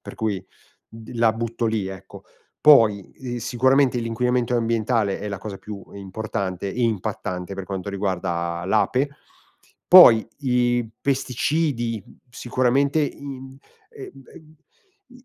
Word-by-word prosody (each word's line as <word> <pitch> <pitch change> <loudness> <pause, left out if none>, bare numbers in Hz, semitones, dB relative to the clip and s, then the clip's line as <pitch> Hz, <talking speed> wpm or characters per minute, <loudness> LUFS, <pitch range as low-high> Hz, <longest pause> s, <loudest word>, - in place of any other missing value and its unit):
per - - -10
cui, 100 -4 -3 0.4
d 115 +1 -12
la 115 -1 +3
butto 115 +1 -3
lì, 110 -3 -1
ecco. 95 -2 -11 0.4
Poi, 110 -10 +5
ehm, 125 -2 -6
sicuramente 130 +2 +2
l'inquinamento 125 +1 0
ambientale 115 -3 0
è 105 - -5
la 100 -1 -5
cosa 100 -1 -7
più 105 -2 -9
importante 100 -1 -4
e 125 - -2
impattante 95 -4 -3
per 95 -1 -6
quanto 95 0 -5
riguarda 85 -3 -2
l'ape. 120 +7 +1 0.8
Poi 120 -12 +9
i 120 -3 +1
pesticidi, 135 -3 -1
mhmm, - - -18
sicuramente 130 +5 +1
in 135 -2 -6 0.3
ehm - - -12 0.3
ehm, 155 -1 -16 0.5
in 250 0 -18
115 Hz, 125 wpm, -23 LUFS, 100-130 Hz, 0.8 s, Poi